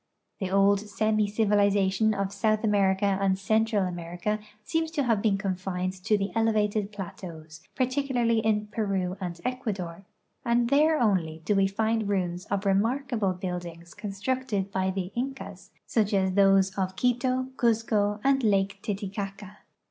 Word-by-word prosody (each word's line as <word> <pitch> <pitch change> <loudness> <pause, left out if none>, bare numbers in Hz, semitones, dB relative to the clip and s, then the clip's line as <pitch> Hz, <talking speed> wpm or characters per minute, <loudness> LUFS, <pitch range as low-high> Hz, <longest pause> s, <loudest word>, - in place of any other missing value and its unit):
The 190 -3 -2
old 195 +1 +4
semi 215 +1 0
civilization 205 0 +2
of 195 0 -2
South 215 +2 +1
America 200 -2 +2
and 190 -1 +2
Central 215 +1 +1
America 175 +4 -3 0.2
seems 325 +6 -1
to 305 -3 -1
have 230 -5 +1
been 205 -3 +2
confined 185 -1 -2
to 215 -1 +3
the 195 0 -2
elevated 215 -2 +1
j)lateaus, 165 -5 -8
particularly 255 -3 +1
in 215 -1 +1
Peru 195 -5 -1
and 175 -2 -4
Ecuador, 200 -9 -3 0.4
and 235 0 +1
there 305 +2 +4
onlv 165 -8 0
do 210 - +2
we 195 -1 +3
find 220 +1 0
ruins 180 -2 -1
of 200 0 -1
the 200 - 0
remarkable 225 -1 +1
Imildings 175 -2 -6
constructed 210 0 -2
by 190 -1 0
the 190 -1 -3
Incas, 200 -7 -5 0.2
such 210 -2 +1
as 190 -1 +2
those 195 -1 +4
of 190 0 -1
Quito, 255 +2 0
Cuzco, 220 -3 +1
and 270 0 +3
Lake 195 -2 +1
Titicaca. 200 0 -5
200 Hz, 145 wpm, -27 LUFS, 190-225 Hz, 0.4 s, old